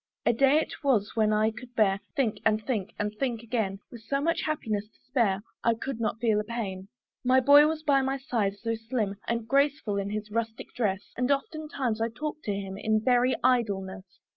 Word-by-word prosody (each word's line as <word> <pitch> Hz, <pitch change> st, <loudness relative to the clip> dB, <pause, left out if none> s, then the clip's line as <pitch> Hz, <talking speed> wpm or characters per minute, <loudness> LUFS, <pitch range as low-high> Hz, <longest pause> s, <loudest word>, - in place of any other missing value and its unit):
A -, -, +4 dB
day 275 Hz, +5 st, +4 dB
it 315 Hz, -, -3 dB
was 230 Hz, -8 st, +2 dB
when 215 Hz, -1 st, +3 dB
I 215 Hz, +1 st, +3 dB
could 245 Hz, +2 st, -12 dB
bear 195 Hz, -3 st, +3 dB
To -, -, -38 dB
think, 255 Hz, -8 st, 0 dB
and 215 Hz, -1 st, +2 dB
think, 215 Hz, -6 st, -2 dB
and 210 Hz, 0 st, -2 dB
think 240 Hz, -4 st, -1 dB
again; 220 Hz, -5 st, -1 dB
With 235 Hz, -, -10 dB
so 275 Hz, +5 st, -1 dB
much 330 Hz, +4 st, +1 dB
happiness 220 Hz, -9 st, -2 dB
to -, -, -32 dB
spare, 220 Hz, -7 st, +1 dB, 0.2 s
I 230 Hz, 0 st, +3 dB
could 245 Hz, +1 st, -5 dB
not 225 Hz, 0 st, -1 dB
feel 220 Hz, -3 st, +2 dB
a -, -, -1 dB
pain. 205 Hz, -4 st, -5 dB, 0.4 s
My 255 Hz, +1 st, +5 dB
boy 285 Hz, +3 st, +7 dB
was 310 Hz, 0 st, -2 dB
by 280 Hz, -3 st, +4 dB
my 270 Hz, +1 st, -1 dB
side, 230 Hz, -8 st, -1 dB
so 230 Hz, +2 st, -2 dB
slim 225 Hz, -3 st, -2 dB
And 230 Hz, -1 st, -1 dB
graceful 275 Hz, -6 st, +1 dB
in 200 Hz, 0 st, -2 dB
his 210 Hz, 0 st, -4 dB
rustic 225 Hz, 0 st, -3 dB
dress! 200 Hz, -5 st, -2 dB
And 250 Hz, +1 st, 0 dB
oftentimes 280 Hz, -5 st, -1 dB
I 225 Hz, -, +1 dB
talked 300 Hz, +6 st, -6 dB
to 210 Hz, -, 0 dB
him, 195 Hz, 0 st, -5 dB
In 220 Hz, 0 st, +2 dB
very 250 Hz, 0 st, +4 dB
idleness. 195 Hz, -7 st, 0 dB
230 Hz, 210 wpm, -28 LUFS, 210-265 Hz, 0.4 s, boy